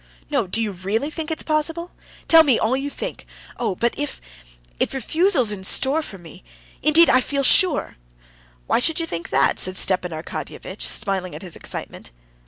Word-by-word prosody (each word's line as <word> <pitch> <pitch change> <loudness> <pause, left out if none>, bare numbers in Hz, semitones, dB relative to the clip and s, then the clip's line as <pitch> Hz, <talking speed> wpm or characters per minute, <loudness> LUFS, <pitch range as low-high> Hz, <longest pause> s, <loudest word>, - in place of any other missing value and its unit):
"No! 260 -9 0
do 225 +5 +2
you 215 - -2
really 200 - -3
think 315 -1 -5
it's 320 - -3
possible? 325 +3 -2
No, - - -33 0.3
tell 325 -1 +8
me 280 -7 +3
all 225 +4 +1
you 275 +2 -3
think! - - -6 0.3
Oh, 230 -6 -2
but 235 +5 0
if... 290 -1 -4 0.6
if - - -1
refusal's 300 - +2
in 195 -2 -5
store 275 +10 +2
for 205 -10 -8
me!... 165 - -14 0.4
Indeed 305 +3 +6
I 255 - +4
feel 280 +2 -2
sure...." 340 +2 +4 0.7
"Why - - +1
should 320 +6 +1
you 330 - -1
think 170 - -6
that?" - - +2
said 185 0 +1
Stepan 185 -1 +1
Arkadyevitch, 165 +4 -7
smiling 195 -4 -2
at - - -9
his 175 -3 -8
excitement. - - -7
255 Hz, 185 wpm, -21 LUFS, 195-310 Hz, 0.7 s, tell